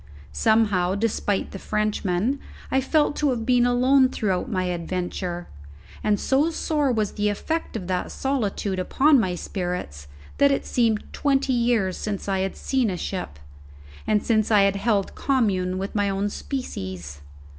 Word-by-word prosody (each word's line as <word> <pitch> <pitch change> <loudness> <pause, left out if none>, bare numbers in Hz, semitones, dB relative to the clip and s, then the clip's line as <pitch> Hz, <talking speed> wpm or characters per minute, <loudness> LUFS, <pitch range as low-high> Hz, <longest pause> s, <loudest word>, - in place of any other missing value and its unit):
Somehow, 205 -5 +2
despite 205 -2 -1
the 195 - -7
Frenchman, 210 +4 0 0.3
I 265 - +3
felt 295 +2 +2
to 295 - +2
have 235 -3 -1
been 245 0 +4
alone 255 +2 +4
throughout 195 -7 -1
my 185 -3 0
adventure; 175 0 -3 0.6
and 210 -1 +2
so 280 +4 +2
sore 300 -4 0
was 215 -4 0
the 210 0 0
effect 320 +11 -3
of 190 - -6
that 180 0 -2
solitude 210 -7 -1
upon 275 +9 +4
my 185 -5 0
spirits 175 - -4 0.3
that 280 - +6
it 275 - 0
seemed 225 -3 +1
twenty 275 -2 +1
years 235 -6 +1
since 205 -2 -4
I 195 -1 0
had 190 0 -2
seen 260 -5 0
a 180 - -3
ship, 175 - -5 0.7
and 210 -1 +2
since 215 -2 +2
I 210 -2 +5
had 195 0 +2
held 200 -1 0
commune 195 -9 0
with 195 +1 -4
my 205 -1 +1
own 195 +1 -1
species. 95 - -5
210 Hz, 155 wpm, -24 LUFS, 185-255 Hz, 0.7 s, that